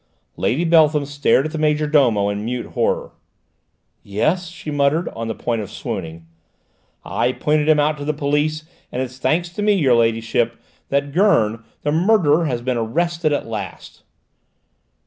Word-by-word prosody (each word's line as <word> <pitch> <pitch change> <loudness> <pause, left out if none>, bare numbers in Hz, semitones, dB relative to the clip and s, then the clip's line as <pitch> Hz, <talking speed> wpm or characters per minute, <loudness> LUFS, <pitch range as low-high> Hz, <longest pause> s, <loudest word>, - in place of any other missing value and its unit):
Lady 160 +8 0
Beltham 155 -3 +4
stared 140 -1 +2
at 155 - -3
the 160 - -4
major 150 0 +1
domo 125 -10 +3
in 100 +1 -3
mute 120 +2 -3
horror. - - 0 0.9
"Yes?" 155 - -1
she 160 -2 -8
muttered, 145 +4 +1
on 115 0 -6
the 110 - -3
point 115 -2 -2
of 100 - -7
swooning. 80 0 -6 0.8
"I 125 +1 0
pointed 150 +2 +1
him 155 -1 +5
out 150 0 +1
to 145 - -5
the 155 - +1
police, 150 +1 -1 0.3
and 130 - -2
it's 130 0 -9
thanks 170 +5 0
to 175 +4 -6
me, 210 0 +3
your 145 -10 +3
ladyship, 115 0 +1 0.3
that 140 0 0
Gurn, 115 - +2 0.2
the 145 - 0
murderer, 170 -2 +3
has 120 -5 -2
been 125 -1 -1
arrested 165 +8 0
at 145 - -1
last!" 105 -5 -7
145 Hz, 165 wpm, -20 LUFS, 115-155 Hz, 0.9 s, him